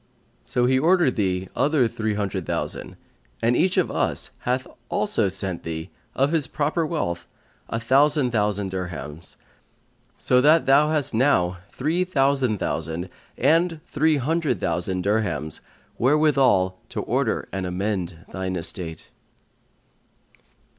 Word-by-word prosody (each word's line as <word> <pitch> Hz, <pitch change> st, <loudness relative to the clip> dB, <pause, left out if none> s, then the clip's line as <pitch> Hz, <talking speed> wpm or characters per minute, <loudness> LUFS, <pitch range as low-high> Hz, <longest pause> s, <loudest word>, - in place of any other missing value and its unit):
So 125 Hz, -, 0 dB
he 130 Hz, +1 st, +3 dB
ordered 170 Hz, -2 st, +3 dB
thee 95 Hz, -3 st, -1 dB
other 145 Hz, -4 st, +3 dB
three 110 Hz, -1 st, -2 dB
hundred 100 Hz, -2 st, -3 dB
thousand, -, -, -3 dB, 0.4 s
and 120 Hz, +2 st, +2 dB
each 185 Hz, +6 st, +2 dB
of -, -, +2 dB
us -, -, -1 dB
hath 130 Hz, +1 st, -1 dB, 0.2 s
also 205 Hz, -, +1 dB
sent 95 Hz, -2 st, -2 dB
thee, 80 Hz, +2 st, -6 dB, 0.2 s
of 135 Hz, +3 st, +2 dB
his 155 Hz, -5 st, +2 dB
proper 155 Hz, +3 st, -1 dB
wealth, 85 Hz, -, -3 dB, 0.4 s
a 115 Hz, -, -2 dB
thousand 135 Hz, +2 st, +3 dB
thousand 105 Hz, -3 st, 0 dB
dirhams: 85 Hz, -4 st, -6 dB, 0.8 s
so 125 Hz, 0 st, +3 dB
that 155 Hz, +4 st, +5 dB
thou 145 Hz, +3 st, +5 dB
hast 150 Hz, -5 st, 0 dB
now 95 Hz, -8 st, +2 dB
three 160 Hz, +7 st, 0 dB
thousand 135 Hz, -, +1 dB
thousand 85 Hz, 0 st, -3 dB, 0.3 s
and 165 Hz, 0 st, +2 dB
three 155 Hz, 0 st, +2 dB
hundred 145 Hz, -, 0 dB
thousand 90 Hz, +2 st, -1 dB
dirhams 90 Hz, -8 st, -1 dB, 0.4 s
wherewithal 130 Hz, -10 st, +3 dB
to -, -, -3 dB
order -, -, -1 dB
and 95 Hz, -1 st, -2 dB
amend 90 Hz, -3 st, -3 dB
thine 95 Hz, 0 st, -3 dB
estate.'" 85 Hz, -1 st, -4 dB
115 Hz, 125 wpm, -24 LUFS, 95-150 Hz, 0.8 s, that